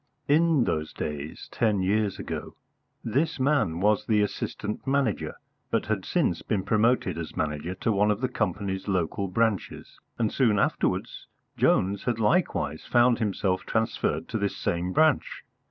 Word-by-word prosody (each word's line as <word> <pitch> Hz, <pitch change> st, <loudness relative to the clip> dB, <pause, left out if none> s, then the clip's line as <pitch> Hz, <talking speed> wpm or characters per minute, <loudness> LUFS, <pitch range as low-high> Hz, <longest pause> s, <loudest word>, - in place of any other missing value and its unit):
In 155 Hz, -2 st, +4 dB
those 80 Hz, -6 st, -2 dB
days 75 Hz, +1 st, -5 dB
ten 105 Hz, -5 st, +1 dB
years 100 Hz, +1 st, +1 dB
ago -, -, -6 dB, 0.5 s
this 145 Hz, +7 st, 0 dB
man 130 Hz, -, +1 dB
was 105 Hz, +1 st, +2 dB
the 105 Hz, -2 st, +3 dB
Assistant 105 Hz, +3 st, -4 dB
Manager, 135 Hz, -6 st, 0 dB, 0.3 s
but -, -, 0 dB
had -, -, -2 dB
since -, -, 0 dB
been 95 Hz, -, -1 dB
promoted 110 Hz, -5 st, +2 dB
as 80 Hz, -, -7 dB
Manager 75 Hz, +4 st, -2 dB
to 110 Hz, +4 st, -1 dB
one 105 Hz, 0 st, +3 dB
of 105 Hz, 0 st, +1 dB
the 130 Hz, -, 0 dB
company's 95 Hz, -2 st, -2 dB
local 95 Hz, +1 st, -1 dB
branches; 110 Hz, 0 st, -1 dB, 0.2 s
and 110 Hz, -2 st, 0 dB
soon 115 Hz, -6 st, +3 dB
afterwards -, -, -1 dB, 0.3 s
Jones 100 Hz, +3 st, +2 dB
had 120 Hz, -3 st, 0 dB
likewise 105 Hz, -, +1 dB
found 120 Hz, 0 st, +3 dB
himself 95 Hz, -3 st, 0 dB
transferred 110 Hz, 0 st, -1 dB
to 110 Hz, -, -2 dB
this 100 Hz, -1 st, -1 dB
same 90 Hz, +1 st, -1 dB
branch. 155 Hz, +5 st, +2 dB
105 Hz, 150 wpm, -27 LUFS, 95-120 Hz, 0.5 s, In